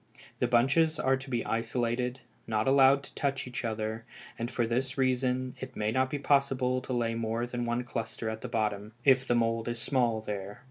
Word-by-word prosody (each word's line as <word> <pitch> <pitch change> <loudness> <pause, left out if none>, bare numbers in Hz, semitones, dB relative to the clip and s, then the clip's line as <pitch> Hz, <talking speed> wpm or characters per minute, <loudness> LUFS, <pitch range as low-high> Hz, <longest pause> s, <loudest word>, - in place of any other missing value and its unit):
The 125 - +2
bunches 140 +7 +3
are 135 0 +3
to 135 +1 -8
be 120 -2 -1
isolated, 120 +2 -1 0.3
not 110 0 0
allowed 135 0 +6
to - - -11
touch 135 -1 -1
each 125 +1 -5
other, 110 0 -3 0.4
and 115 +1 -2
for 120 - 0
this 130 +4 -1
reason 130 -1 +1
it - - -7
may 105 0 0
not 130 +2 +1
be 145 - -2
possible 135 -3 +2
to - - -7
lay 115 -2 0
more 115 +1 -1
than 120 0 -3
one 120 +1 -1
cluster 115 -1 -4
at 110 0 -3
the - - -4
bottom, 105 -1 -2
if 130 -1 +5
the 120 - +3
mould 115 -1 +1
is 120 -1 -2
small 120 -4 +1
there. 105 -2 -5
120 Hz, 200 wpm, -30 LUFS, 115-130 Hz, 0.4 s, allowed